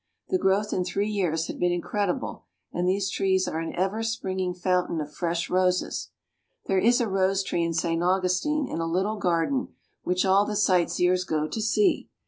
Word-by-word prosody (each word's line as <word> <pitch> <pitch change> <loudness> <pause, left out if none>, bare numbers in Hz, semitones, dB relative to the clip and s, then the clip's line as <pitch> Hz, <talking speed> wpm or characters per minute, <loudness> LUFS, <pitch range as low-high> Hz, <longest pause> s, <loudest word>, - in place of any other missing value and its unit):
The 370 - +1
growth 200 - +1
in 180 - 0
three 200 +4 -1
years 165 -6 0
had - - -7
been 180 0 +2
incredible; 180 +2 -2 0.3
and 180 +1 0
these 195 +1 0
trees 190 -1 +1
are 160 - -2
an 165 - -4
ever 195 +5 0
springing 190 -5 -2
fountain 180 -2 0
of 150 0 -5
fresh 170 -1 -2
roses. 185 0 0 0.6
There 190 -1 +2
is 240 +5 +4
a 235 - +1
rose 195 0 +1
tree 170 -2 -1
in 165 -1 -1
St. 165 0 0
Augustine, 185 - +1
in - - -4
a 165 - -1
little 190 +6 0
garden, 185 +8 0 0.3
which 180 +2 0
all 195 +1 +5
the 210 0 -3
sight 185 -4 +3
seers 180 +1 +2
go 155 -3 -1
to 220 - -4
see. 355 - +2
185 Hz, 190 wpm, -26 LUFS, 175-200 Hz, 0.6 s, all